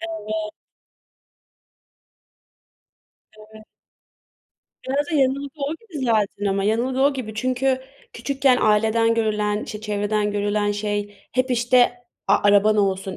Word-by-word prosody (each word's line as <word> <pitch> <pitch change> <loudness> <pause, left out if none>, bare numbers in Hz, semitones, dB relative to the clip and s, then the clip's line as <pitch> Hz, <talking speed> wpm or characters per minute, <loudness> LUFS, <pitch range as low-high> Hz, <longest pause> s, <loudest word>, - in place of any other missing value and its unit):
Evet. 215 -10 -5 2.9
Evet. 215 0 -15 1.2
Biraz 285 +2 0
da 320 - -2
yanılgı 280 +1 0
o 280 +3 -2
gibi 325 - -7
zaten 210 -3 0
ama 195 0 0
yanılgı 240 +5 0
o 280 +1 +4
gibi 225 -5 -6
çünkü 255 +3 0 0.3
küçükken 270 +1 +1
aileden 220 +2 +3
görülen, 210 -2 0
işte, 210 - -7
çevreden 210 0 -1
görülen 205 0 0
şey 205 0 -3 0.2
hep, 255 +1 0
işte, 245 0 +3 0.4
"A, - - +6
araban 205 +1 +4
olsun, 190 -1 0
220 Hz, 115 wpm, -22 LUFS, 210-260 Hz, 2.9 s, A